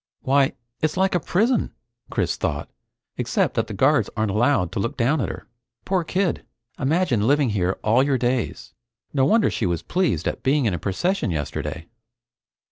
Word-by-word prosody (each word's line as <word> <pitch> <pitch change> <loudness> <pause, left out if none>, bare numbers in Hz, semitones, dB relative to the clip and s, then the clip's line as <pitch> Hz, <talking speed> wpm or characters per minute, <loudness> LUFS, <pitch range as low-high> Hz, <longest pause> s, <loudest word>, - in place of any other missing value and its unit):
Why 135 0 +3 0.3
it's 155 +1 0
like 190 +1 +2
a 175 - +2
prison! 220 - +1 0.3
Chris - - 0
thought, - - -3 0.5
except - - 0
that - - 0
the - - -6
guards - - +3
aren't 110 -2 +1
allowed 110 -4 +2
to - - -3
look 115 +4 -2
down 135 +4 +2
at 100 - -1
her. 95 - -7
The 120 0 -48
poor 185 -2 +1
kid! 180 0 -1 0.4
Imagine 130 - +1
living 140 -3 +3
here 95 -2 0
all 115 +4 +4
your 135 -1 +2
days! 125 0 -2 0.4
No 135 -2 +3
wonder 220 +9 +3
she - - -1
was 85 -2 -2
pleased 175 - 0
at - - -3
being 140 0 +2
in 105 - +1
a 90 - -2
procession 175 - -1
yesterday! 80 +1 -4
130 Hz, 180 wpm, -23 LUFS, 105-160 Hz, 0.5 s, all